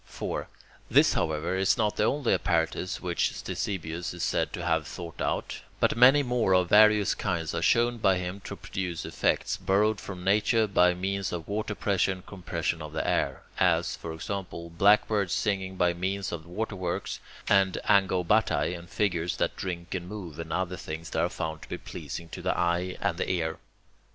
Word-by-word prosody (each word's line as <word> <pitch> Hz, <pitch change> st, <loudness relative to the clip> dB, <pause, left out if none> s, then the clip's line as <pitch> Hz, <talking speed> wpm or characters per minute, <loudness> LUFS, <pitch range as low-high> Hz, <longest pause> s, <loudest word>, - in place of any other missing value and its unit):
4. -, -, -4 dB, 0.4 s
This, -, -, +5 dB
however, 80 Hz, +3 st, -1 dB
is 95 Hz, 0 st, +2 dB
not 105 Hz, -2 st, +1 dB
the 105 Hz, -, +2 dB
only 140 Hz, -1 st, +1 dB
apparatus 85 Hz, +2 st, 0 dB
which 90 Hz, -1 st, 0 dB
Ctesibius 85 Hz, -3 st, -4 dB
is 85 Hz, -, -4 dB
said -, -, 0 dB
to 85 Hz, -, -5 dB
have 80 Hz, -2 st, +1 dB
thought 85 Hz, -3 st, -8 dB
out, -, -, -2 dB, 0.2 s
but -, -, +3 dB
many 130 Hz, +4 st, +7 dB
more 120 Hz, -7 st, +2 dB
of 90 Hz, -1 st, +2 dB
various 105 Hz, -1 st, +6 dB
kinds 85 Hz, -5 st, -2 dB
are -, -, -1 dB
shown 120 Hz, 0 st, +3 dB
by 95 Hz, -3 st, +3 dB
him 90 Hz, +2 st, -4 dB
to -, -, -5 dB
produce 90 Hz, -4 st, -4 dB
effects, -, -, 0 dB
borrowed 105 Hz, +2 st, +2 dB
from 90 Hz, -3 st, -7 dB
nature, 105 Hz, +3 st, +3 dB
by 90 Hz, -3 st, +3 dB
means 95 Hz, +1 st, -2 dB
of 85 Hz, -3 st, -5 dB
water 105 Hz, +1 st, -2 dB
pressure 100 Hz, -2 st, +1 dB
and 95 Hz, -1 st, -12 dB
compression 85 Hz, -4 st, -3 dB
of 75 Hz, 0 st, -7 dB
the 80 Hz, -, -2 dB
air; -, -, 0 dB, 0.2 s
as, -, -, +2 dB
for 85 Hz, -, -7 dB
example, 85 Hz, 0 st, -5 dB
blackbirds 100 Hz, +2 st, +3 dB
singing 95 Hz, -3 st, -1 dB
by 90 Hz, -1 st, +2 dB
means 95 Hz, +2 st, -2 dB
of 85 Hz, -1 st, -6 dB
waterworks, 95 Hz, -2 st, -3 dB, 0.3 s
and 95 Hz, -1 st, +3 dB
"angobatae," 95 Hz, -2 st, +3 dB
and 85 Hz, 0 st, -10 dB
figures 90 Hz, -5 st, 0 dB
that -, -, 0 dB
drink 85 Hz, -2 st, -5 dB
and 90 Hz, -1 st, -4 dB
move, 90 Hz, -7 st, -7 dB
and 80 Hz, -1 st, -6 dB
other 95 Hz, -1 st, -1 dB
things 80 Hz, +2 st, -7 dB
that 80 Hz, -, -1 dB
are 85 Hz, -, +1 dB
found 80 Hz, -2 st, -4 dB
to -, -, -12 dB
be -, -, -3 dB
pleasing 85 Hz, 0 st, -7 dB
to -, -, -7 dB
the -, -, 0 dB
eye 85 Hz, +1 st, 0 dB
and 95 Hz, -4 st, 0 dB
the -, -, -1 dB
ear. 80 Hz, -3 st, -1 dB
90 Hz, 185 wpm, -28 LUFS, 85-100 Hz, 0.4 s, many